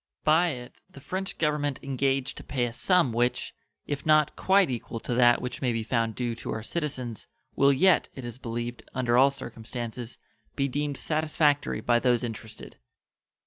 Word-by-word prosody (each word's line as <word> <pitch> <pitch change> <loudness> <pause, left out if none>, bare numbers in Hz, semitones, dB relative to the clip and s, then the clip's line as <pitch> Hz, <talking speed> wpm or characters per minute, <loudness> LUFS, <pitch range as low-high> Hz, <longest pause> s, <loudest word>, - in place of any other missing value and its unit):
By 160 +3 +4
it 125 -6 -6
the - - -13
French 185 +7 -4
Government 150 -3 0
engage 135 0 0
to - - -10
pay 125 -3 -1
a 120 - -4
sum 175 -3 +2
which, 120 +2 0 0.3
if 140 -1 -4
not 155 -1 +4
quite 195 0 +4
equal 120 -2 -4
to 120 - -4
that 120 0 +4
which 125 - -5
may 125 -3 +1
be 115 -1 -1
found 115 -1 0
due 120 -2 -2
to - - -5
our 110 - -5
citizens, 130 - -4 0.3
will 140 0 +5
yet, 175 +6 +4
it 130 - -7
is 120 +1 -7
believed, 120 0 -4
under 120 -2 +1
all 135 +3 +6
circumstances, 120 -2 -6 0.4
be 140 -1 +1
deemed 145 +1 -2
satisfactory 155 -2 +1
by 120 -1 +3
those 125 -1 +2
interested. 110 -1 -7
130 Hz, 175 wpm, -27 LUFS, 120-145 Hz, 0.4 s, all